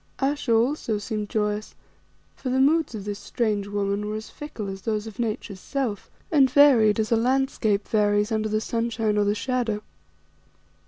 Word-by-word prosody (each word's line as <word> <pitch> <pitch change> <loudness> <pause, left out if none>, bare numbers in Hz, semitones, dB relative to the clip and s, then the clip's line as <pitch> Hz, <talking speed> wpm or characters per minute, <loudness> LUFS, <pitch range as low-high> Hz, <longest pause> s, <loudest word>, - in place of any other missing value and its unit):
Ayesha 275 -2 -1
also 230 -1 +1
seemed 210 0 -4
joyous, 210 0 -2 0.6
for 260 - -5
the 260 +1 +1
moods 305 -1 +3
of 205 -2 -6
this 205 0 -4
strange 210 -1 -1
woman 205 0 -1
were 210 - -3
as 215 0 -7
fickle 235 -8 -7
as 195 0 -6
those 215 +1 -2
of 220 0 -10
Nature's 215 -4 -3
self, 245 -4 -3 0.2
and 275 -4 +5
varied 250 -6 +5
as 215 +1 -1
a - - +5
landscape 230 -4 +1
varies 210 0 +2
under 215 0 0
the 215 0 0
sunshine 225 -2 -1
or 205 -1 +2
the 205 +1 +1
shadow. 230 -3 -1
220 Hz, 170 wpm, -25 LUFS, 210-250 Hz, 0.6 s, and